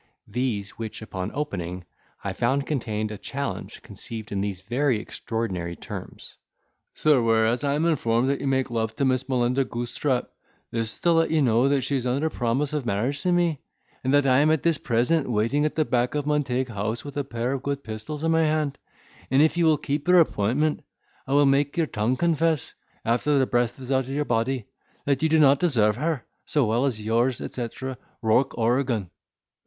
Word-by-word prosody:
these; 115 -6 -3
which, 110 -1 -5
upon 95 -3 -4
opening, 90 - -3 0.4
I - - -2
found 140 +1 0
contained 110 -7 -2
a 105 - -7
challenge 140 +1 -5
conceived 110 -2 -8
in 100 -1 -1
these 100 -3 -3
very 125 +4 +1
extraordinary 95 -7 -4
terms: - - -9 0.6
"Sir,—Whereas 115 -4 +3
I 140 0 +1
am 155 +3 +1
informed 125 -7 +2
that 140 - -2
you 140 - -2
make 130 -2 +1
love 110 -1 -1
to 140 - 0
Miss 130 0 +1
Melinda 125 +1 +2
Goosetrap, 120 +2 -2 0.4
this 115 -1 -2
is - - -12
to 175 - +3
let 165 0 +3
you 155 -2 +2
know 120 +1 +3
that 140 -2 +2
she 140 - -1
is 125 -1 -2
under 140 +6 0
promise 130 +5 -1
of 150 -2 -1
marriage 120 +6 -1
to 180 - +1
me; 175 -4 +1 0.4
and 130 - +1
that 145 0 +4
I 130 -1 +5
am 150 +2 +4
at 160 -2 +2
this 165 -4 +2
present 125 +5 +1
waiting 120 +7 +1
at 155 - -1
the 155 - +2
back 125 +1 0
of 145 -1 -1
Montague 130 -5 0
House, 110 +5 -3
with 145 - -8
a 145 - 0
pair 120 -1 -3
of 135 - -3
good 140 0 -3
pistols 115 +8 -6
in 165 - +2
my 165 0 +4
hand; 155 -3 0 0.5
and 135 +3 +5
if 160 - +2
you 170 -1 +2
will 155 -1 +5
keep 145 +2 -3
your 180 0 +7
appointment, 150 +1 +1 0.4
I 135 - -1
will 145 0 +5
make 140 +3 +2
your 165 - +3
tongue 115 -1 -1
confess 165 -2 +1 0.3
(after 125 +6 +2
the 135 - +4
breath 120 0 0
is 130 0 -6
out 130 -1 +2
of - - -10
your 150 0 0
body) 120 0 0 0.4
that 140 -2 +1
you 160 - +2
do 160 - +4
not 140 -2 +5
deserve 110 - +2
her 150 -3 -1 0.2
so 145 -4 +3
well 115 +5 +1
as 125 -6 -1
Yours, 115 +4 +1
etc. 125 +1 -5 0.2
Rourk 115 +4 +2
Oregan." 115 -4 0
130 Hz, 200 wpm, -25 LUFS, 115-145 Hz, 0.6 s, your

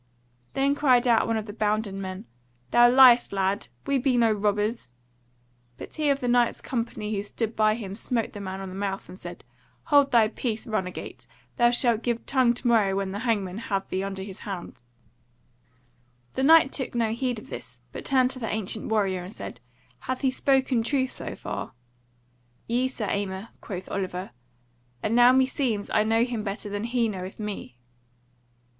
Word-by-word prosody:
Then 275 +1 +2
cried 260 -4 +3
out 230 -2 +4
one 225 -1 +1
of 215 - -3
the 205 - -8
bounden 210 -2 -1
men: 185 0 -6 0.5
"Thou 240 0 +7
liest, 250 -1 +7
lad, 195 +1 0 0.2
we 280 -1 +1
be 255 -1 +2
no 230 -2 +4
robbers." 210 - 0 0.9
But - - -9
he 305 -2 0
of 280 0 +1
the 250 - -1
Knight's 240 -1 +2
company 230 -3 -3
who 200 - -1
stood 220 +2 -3
by 215 0 +3
him 200 -5 -6
smote 230 +2 -1
the 205 - -7
man 190 0 -5
on 190 - -6
the - - -8
mouth 195 0 -3
and - - -10
said: 175 -2 -9 0.5
"Hold 285 -1 +6
thy 225 -3 +4
peace, 225 0 -3
runagate! 190 -6 -4 0.3
Thou 240 0 +5
shalt 240 -2 +2
give 235 -1 -2
tongue 255 -3 +3
to 245 - -2
morrow 215 -5 +3
when 195 -1 -2
the 200 - -4
hangman 210 -5 -1
hath 195 -4 -3
thee 190 - -1
under 195 -1 -4
his 195 -1 -9
hands." 190 -4 -6 1.6
The - - -2
Knight 310 0 +6
took 265 -3 -3
no 230 -2 +1
heed 245 +1 -1
of 215 - -11
this; 125 +1 -8
but - - -7
turned 260 -1 +3
to 260 - -3
the 225 -3 -3
ancient 215 0 -2
warrior 195 -4 +1
and 180 - -8
said: 165 - -8 0.4
"Hath 255 0 -4
he 265 -2 +2
spoken 260 -2 +2
truth 260 +2 0
so - - -5
far?" - - -6 0.9
"Yea, 245 +3 +1
Sir 245 -4 -4
Aymer," 200 +2 -3
quoth 190 -3 -6
Oliver; 185 -1 -3 0.7
"And 220 - 0
now 245 +1 +7
meseems 255 -5 +1
I 210 - +4
know 225 +1 +3
him 240 -3 -2
better 205 0 -4
than 205 +2 -3
he 235 -1 +1
knoweth 190 -2 -6
me." 205 - -6
220 Hz, 185 wpm, -26 LUFS, 200-245 Hz, 1.6 s, Thou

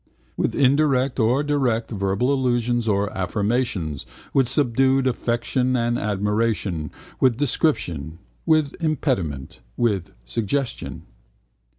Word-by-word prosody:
With - - -1
indirect 135 -1 +2
and 125 +6 +2
direct 125 -6 0
verbal 100 +5 0
allusions 120 -3 +1
or 100 0 0
affirmations: 95 - -1 0.3
with 130 -3 +3
subdued 135 0 +2
affection 125 +1 0
and 120 0 +1
admiration: 105 -5 -1 0.3
with 125 -3 +3
description: 90 - 0 0.3
with 155 -3 +3
impediment: 120 - -1 0.2
with 105 -7 0 0.2
suggestion. 115 - -3
120 Hz, 95 wpm, -23 LUFS, 100-135 Hz, 0.3 s, with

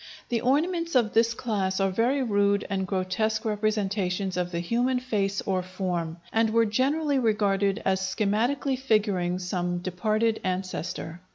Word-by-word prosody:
The 235 -2 0
ornaments 335 +5 +1
of 230 -4 +3
this 230 +1 +3
class 200 -6 -1
are 195 0 +2
very 245 +7 +1
rude 200 -3 +2
and 190 -1 -1
grotesque 210 +4 -1
representations 200 -3 -1
of 180 -1 -1
the 170 - -2
human 240 +8 +1
face 200 -6 -1
or 190 -2 -1
form, 180 -3 -3 0.2
and 225 0 +3
were 230 +1 +3
generally 275 +6 +1
regarded 205 -3 +1
as 190 0 +2
schematically 220 +8 0
figuring 205 -8 +1
some 180 -1 -2
departed 215 +5 0
ancestor. 185 -2 -4
205 Hz, 145 wpm, -26 LUFS, 185-230 Hz, 0.2 s, of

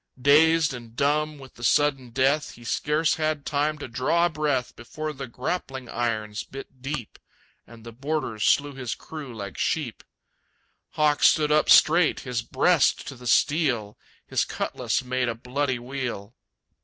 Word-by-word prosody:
Dazed 155 +3 +5
and 120 -2 -10
dumb 150 +3 +1
with 135 -2 -13
the 120 - -13
sudden 135 -2 +2
death, 135 +5 +1
He 120 - -15
scarce 150 +6 0
had 155 -2 -1
time 150 +1 0
to 145 - -7
draw 130 +8 +1
a - - +2
breath 145 -5 -1
Before 155 +6 -6
the 135 -1 -7
grappling 130 0 -4
irons 110 -3 -2
bit 135 -1 -11
deep, 135 -4 -5 0.5
And 115 0 -14
the 115 - -9
boarders 130 -3 -3
slew 145 0 +3
his 130 -3 -4
crew 150 -5 -9
like 100 -5 -7
sheep. - - -2 0.9
Hawk 150 -1 +2
stood 150 -2 +4
up 155 0 +3
straight, 165 +1 +5
his 125 -3 -3
breast 140 +6 +2
to 135 - -8
the 125 0 -9
steel; 120 -4 +2 0.3
His - - 0
cutlass - - -2
made 125 -1 -1
a 115 - -3
bloody 130 +3 -2
wheel. 120 -4 -5
135 Hz, 155 wpm, -25 LUFS, 120-150 Hz, 0.9 s, Dazed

